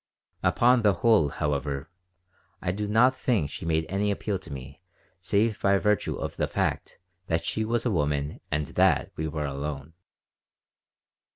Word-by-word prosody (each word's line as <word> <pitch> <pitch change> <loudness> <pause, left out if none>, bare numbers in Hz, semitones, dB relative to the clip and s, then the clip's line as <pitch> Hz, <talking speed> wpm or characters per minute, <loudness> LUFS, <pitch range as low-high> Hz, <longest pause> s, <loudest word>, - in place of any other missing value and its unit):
Upon 125 +1 +4
the 105 -2 +4
whole, 110 -11 +5
however, 70 0 -2 0.7
I 90 - -1
do 105 +3 -3
not 120 +5 +4
think 105 - 0
she - - -6
made 80 -1 +1
any 100 +4 0
appeal 100 -1 -2
to 95 - -12
me 70 +3 -9 0.4
save 100 +3 +1
by 100 0 +4
virtue 105 -1 +1
of - - -5
the - - 0
fact - - -2 0.3
that 80 0 0
she 110 - -1
was 115 +2 -1
a 120 - +2
woman 75 -4 -1
and 75 -1 0
that - - +2
we 80 - -2
were 75 -1 -3
alone. 70 +2 -5
90 Hz, 160 wpm, -27 LUFS, 75-105 Hz, 0.7 s, whole